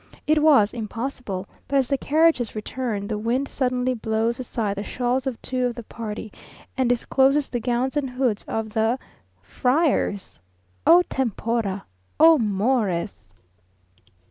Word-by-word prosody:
It 305 0 +3
was 275 -10 +5
impossible, 225 -3 -5 0.2
but 280 - +1
as 265 -2 +2
the 275 - +1
carriages 310 -7 +2
return, 215 -2 -3
the 210 -1 -3
wind 245 +5 0
suddenly 255 -1 0
blows 225 +1 -1
aside 220 -5 -3
the 200 - -3
shawls 250 +3 -1
of 255 -4 -3
two 255 -1 0
of 240 - -4
the 235 - -7
party, 220 -1 -7 0.4
and 260 -2 +1
discloses 270 +3 +2
the 245 - -2
gowns 245 +3 -1
and 285 -3 0
hoods 250 -4 -1
of 220 -1 -3
the 225 +2 +1 0.5
friars! 250 - 0 0.5
_O 350 +2 +8
tempora! 230 -5 -2 0.3
O 320 -1 +7
Mores! 205 - -1
245 Hz, 140 wpm, -23 LUFS, 215-265 Hz, 0.5 s, O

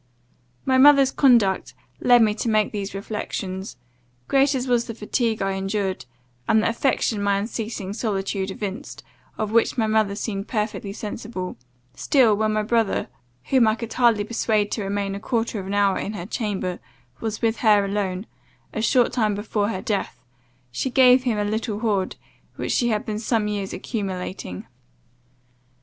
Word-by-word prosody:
My 260 -1 +3
mother's 275 -1 +7
conduct 235 -9 +3 0.2
led 245 -2 +6
me 215 -1 +3
to 230 +2 -2
make 215 -1 +2
these 200 -2 -4
reflections. 195 - -5 0.5
Great 275 +1 +3
as 260 0 -2
was 240 -1 +2
the 230 - -6
fatigue 225 0 -1
I 195 - 0
endured, 195 -2 -2 0.4
and 220 0 +4
the - - +2
affection 230 -3 0
my 200 0 +2
unceasing 210 -2 -4
solicitude 195 -3 -2
evinced, 205 +7 -6 0.3
of 215 -1 -2
which 230 +2 +2
my 225 - +2
mother 215 -2 +1
seemed 200 -1 -4
perfectly 210 -3 -2
sensible, 205 -2 -6 0.4
still, 255 -6 +3
when 215 +1 +1
my 215 0 +1
brother, 225 -1 0 0.4
whom 255 -4 +5
I 220 - +3
could 230 -1 -6
hardly 235 -4 +3
persuade 215 -1 0
to 215 - -2
remain 200 0 -2
a 200 - -4
quarter 225 0 -1
of 190 - -6
an 200 - -2
hour 200 -1 +3
in 210 - -4
her 175 -4 -6
chamber, 195 -4 -3 0.4
was 220 0 -4
with 225 0 +2
her 210 -3 +4
alone, 195 -1 -2 0.5
a 220 - -2
short 240 +2 +3
time 215 -4 +1
before 205 0 -1
her 185 -4 -4
death, 205 -2 -2 0.5
she 195 - -2
gave 255 0 +5
him 235 -4 +1
a 210 - 0
little 215 0 -2
hoard, 205 -5 0 0.4
which - - -3
she 240 - +2
had 215 +1 -1
been 215 -3 -3
some 225 -1 0
years 200 -2 -3
accumulating. 185 - -5
215 Hz, 165 wpm, -23 LUFS, 200-230 Hz, 0.5 s, mother's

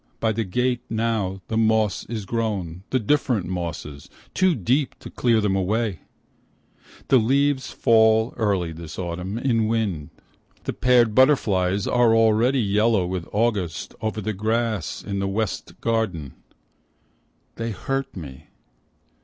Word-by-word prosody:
By 110 - +1
the 115 +1 -1
gate 125 +5 0
now, 110 -4 -1
the 110 - -2
moss 110 -2 +2
is 110 -4 -5
grown, 95 -6 -3
the 130 - +1
different 120 -4 +1
mosses, 85 -5 -5 0.2
Too 185 -3 +3
deep 130 - 0
to - - -11
clear 115 -3 +2
them 105 -2 +1
away! 100 -1 0 1.1
The 130 - +6
leaves 135 +4 +1
fall 110 0 +3
early 95 -6 0
this 80 0 -9
autumn, 90 +3 -4
in 115 -3 +1
wind. 100 -9 -1 0.5
The - - -3
paired 120 -3 +3
butterflies 100 -8 +3
are 120 -2 +3
already 115 +4 +3
yellow 105 -1 +2
with 90 -1 -4
August 100 -6 -1
Over 110 0 -2
the 110 +2 -2
grass 110 -2 -1
in 100 -1 -3
the 100 - -1
West 105 +1 -3
garden, 100 - -1 1.2
They 115 0 -3
hurt 135 +5 -3
me. 70 -6 -9
110 Hz, 135 wpm, -23 LUFS, 95-115 Hz, 1.2 s, The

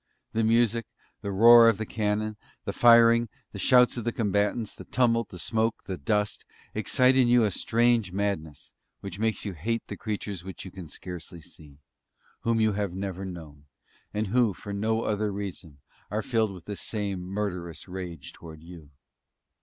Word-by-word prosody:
The 115 - +1
music, 115 0 +2 0.3
the 100 - -4
roar 115 +3 +8
of 110 - +1
the 110 - -3
cannon, 110 0 -1 0.3
the - - -3
firing, 115 -1 +6 0.2
the - - -8
shouts 125 -1 +4
of 120 - -3
the 120 - 0
combatants; 105 0 0
the - - -10
tumult, 115 -2 +1
the 90 - -10
smoke, 110 +5 -1
the 95 - -4
dust 105 +7 -1 0.3
excite 130 0 +3
in 130 -2 +4
you 120 -1 +5
a 105 - +2
strange 115 -1 +1
madness, 95 -7 -3 0.3
which 100 -1 -7
makes 110 0 -1
you 100 - -3
hate 115 +8 -2
the - - -4
creatures 105 -4 -4
which 95 +1 -8
you 95 - -8
can 95 -3 -9
scarcely 85 +2 -8
see 75 -2 -15 0.6
whom 115 0 0
you 110 -1 +3
have 100 -3 -2
never 95 -1 -4
known, 80 -6 -9 0.5
and 105 +1 -1
who, 115 -3 +2
for 100 - -8
no 110 +3 0
other 105 0 -1
reason, 95 -6 -7 0.3
are 105 +2 -2
filled 110 -3 +1
with 90 -3 -11
the 105 - -5
same 100 -3 -3
murderous 90 -3 -4
rage 85 -7 -7
towards 80 -2 -12
you! 85 -4 -12
105 Hz, 175 wpm, -27 LUFS, 90-115 Hz, 0.6 s, roar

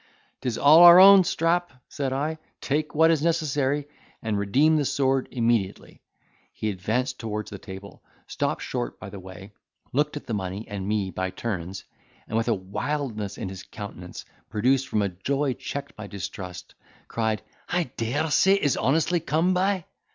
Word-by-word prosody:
"'Tis 125 -3 -2
all 150 +3 +7
our 175 +1 +10
own, 195 0 +9
Strap," 175 +1 0 0.2
said 140 -3 -3
I; 150 +4 -2 0.2
"take 150 +2 -2
what 160 +2 +5
is 160 -3 +1
necessary, 150 -3 0 0.4
and 110 -2 -1
redeem 130 +11 +3
the 150 - +2
sword 135 -1 +1
immediately." 115 -5 -1 0.5
He 110 - -3
advanced 115 +7 -2
towards 105 -2 -4
the 100 - -7
table, 95 0 -10 0.2
stopped - - -2
short - - -4
by 100 - -9
the 100 - -8
way, 95 +2 -11 0.4
looked 150 +2 +1
at - - -8
the 115 - -4
money 95 +1 -4
and 100 -2 -5
me 105 -3 -1
by 95 0 -2
turns, 95 -2 -5 0.4
and 110 - -4
with 115 +1 +1
a 115 - +3
wildness 105 +2 -4
in - - -4
his 95 -1 -8
countenance, 100 -3 -9 0.2
produced 130 +5 +1
from 100 -7 -1
joy 140 -1 +1
checked 140 +3 -6
by 105 -1 -8
distrust, 95 -2 -7 0.3
cried, 110 -2 -1 0.3
"I 180 0 +1
dare 145 +8 -1
say 190 +5 +5
it 200 - -2
is 145 - +2
honestly 160 +5 +2
come 160 +5 +1
by." 185 -1 +1
125 Hz, 165 wpm, -25 LUFS, 100-150 Hz, 0.5 s, our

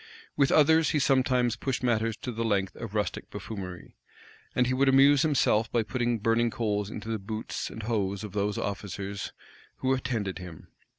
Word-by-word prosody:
[*] 450 - -26
With 140 -2 +3
others 160 +1 +5
he - - +1
sometimes 130 -4 +2
pushed 130 +3 -3
matters 115 -2 +1
to 125 - -3
the 115 0 -3
length 100 -4 0
of 110 -2 -7
rustic 105 -1 -2
buffoonery; 95 -3 -7 0.6
and 125 - +3
he 130 - 0
would 135 +1 +3
amuse 135 +1 +6
himself 130 -7 +2
by 120 -2 +2
putting 120 +2 -1
burning 115 +2 +2
coals 105 -4 -1
into 110 0 -7
the 110 -1 -1
boots 110 +3 -4
and 110 - -8
hose 100 -3 -1
of 105 - -6
the 100 +1 0 0.2
officers 100 -1 -4 0.4
who 130 0 0
attended 115 -8 -2
him. 90 -3 -10
115 Hz, 180 wpm, -28 LUFS, 100-130 Hz, 0.6 s, amuse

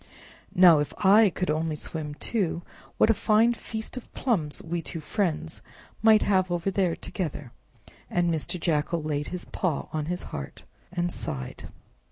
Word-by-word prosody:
Now, 175 -4 +8
if 145 -1 -2
I 205 +2 +7
could 180 -2 -1
only 155 0 -1
swim 150 -1 -4
too, 175 -3 -1 0.3
what 220 - +5
a - - +4
fine 225 +2 +3
feast 220 +1 -6
of 250 - -9
plums 170 - 0
we 170 +1 -2
two 165 - -5
friends 160 -1 -2 0.4
might 220 -1 +6
have 185 -2 +2
over 175 +2 -1
there 185 -3 +1
together!" 150 -8 -5 0.6
And 175 -1 +1
Mr. 165 +2 -2
Jackal 160 0 0
laid 150 -1 -2
his 180 -1 -6
paw 170 -7 -2
on 155 -1 -2
his 180 +1 -3
heart, 70 -2 -6 0.3
and 175 -1 -1
sighed. 65 - -5
175 Hz, 160 wpm, -27 LUFS, 155-195 Hz, 0.6 s, Now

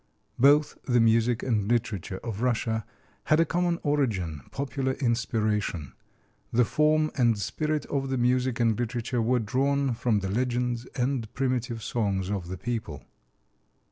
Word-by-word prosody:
Both 145 +3 +4
the 125 -2 +3
music 115 +1 +3
and 105 -5 0
literature 105 -5 -1
of 115 -2 -4
Russia 115 -3 0 0.4
had 155 - +3
a 165 - +5
common 175 +2 0
origin 105 - 0
popular 135 -1 -2
inspiration. 110 - -1 0.6
The 120 +1 +4
form 155 +3 +2
and 120 -5 +3
spirit 150 - -2
of 135 -1 -2
the 135 - 0
music 125 +1 +1
and 115 -1 +2
literature 120 0 -1
were 125 +3 +2
drawn 135 +4 +1
from 115 -3 0
the 95 - -3
legends 120 +1 -1
and 125 -4 -1
primitive 125 -3 -1
songs 100 -5 -1
of 95 -4 -3
the 95 +1 -5
people. 110 - -4
120 Hz, 140 wpm, -27 LUFS, 110-135 Hz, 0.6 s, a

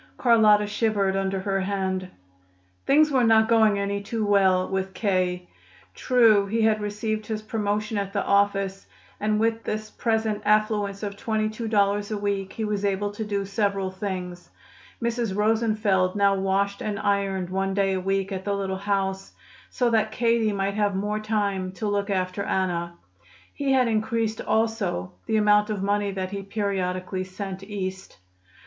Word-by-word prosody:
Carlotta 215 -4 +5
shivered 205 -2 0
under 195 0 -1
her 195 0 -1
hand. 190 -1 -2 0.8
Things 305 +2 +5
were 260 -3 +3
not 220 -1 +5
going 220 -3 +4
any 200 0 -2
too 215 +1 -3
well 190 -2 +3
with 190 0 -3
K. 185 -3 0 0.5
True, 225 -5 +4
he 225 +2 0
had 215 -1 +3
received 215 +1 -3
his 215 -1 -4
promotion 215 0 -2
at 200 -1 -3
the 200 -1 -1
office, 195 -1 +1 0.3
and 210 0 +1
with 225 0 0
this 215 0 -4
present 220 -2 -1
affluence 210 -1 +1
of 200 -1 -4
twenty 215 -1 -1
two 225 +1 -5
dollars 205 -1 +1
a 215 - -2
week 200 -1 -2
he 220 - -3
was 210 -1 -2
able 200 0 0
to 205 +2 -5
do 200 -2 -2
several 200 -2 -1
things. 185 -2 -5 0.5
Mrs. 235 -4 -1
Rosenfeld 215 -3 +1
now 200 -1 +4
washed 195 +1 0
and 210 -2 -2
ironed 195 -3 -1
one 195 0 -1
day 195 -1 +2
a 190 - -1
week 195 +1 -1
at 190 -1 -4
the 200 0 -1
little 190 -1 -2
house, 195 -1 -2 0.4
so 245 -2 0
that 220 -1 +2
Katie 230 -1 +2
might 195 0 -1
have 205 -1 0
more 210 +2 -1
time 200 -3 -1
to 210 +3 -4
look 205 0 -1
after 185 0 -1
Anna. 170 -3 -1 0.6
He 280 -2 -1
had 255 -2 +4
increased 220 0 -1
also 220 - -1 0.2
the 220 - +2
amount 210 0 +4
of 205 -3 -2
money 205 0 +1
that 190 -1 -4
he 200 -1 -4
periodically 190 -2 -2
sent 190 0 -6
East. 190 -2 -6
200 Hz, 165 wpm, -25 LUFS, 195-215 Hz, 0.8 s, Carlotta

